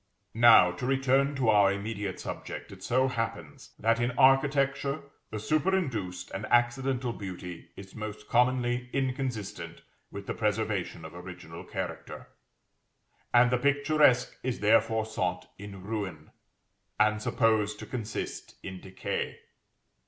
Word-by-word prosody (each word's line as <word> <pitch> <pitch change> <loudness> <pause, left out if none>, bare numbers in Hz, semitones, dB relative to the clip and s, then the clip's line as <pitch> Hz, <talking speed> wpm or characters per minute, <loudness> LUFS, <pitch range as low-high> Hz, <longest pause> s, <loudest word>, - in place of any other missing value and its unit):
Now, 115 -6 +7
to 90 +8 -5
return 135 +1 +2
to 130 -4 +1
our 100 -2 +5
immediate 100 -1 -4
subject, - - -6
it - - -12
so 130 +2 +2
happens 115 - -5
that, 115 +1 +2
in 120 +1 +1
architecture, 140 +1 +3 0.3
the 110 - -5
superinduced 130 - -1
and 110 +3 -5
accidental 120 +1 +1
beauty 90 -4 -8
is 95 -1 -11
most 105 -1 -7
commonly 125 0 +1
inconsistent 125 -11 -3 0.3
with - - -8
the - - -3
preservation - - -1
of - - -9
original 90 0 -9
character, - - -6 1.0
and 120 0 +5
the 125 - +2
picturesque 145 -2 +3
is 125 -1 -2
therefore 110 +1 +3
sought 90 -5 -3
in 100 -2 -9
ruin, 95 -7 -5 0.7
and 110 0 +3
supposed 110 -2 +1
to - - -8
consist 115 -5 -5
in 95 -1 -7
decay. 95 -1 -4
115 Hz, 125 wpm, -29 LUFS, 100-130 Hz, 1.0 s, Now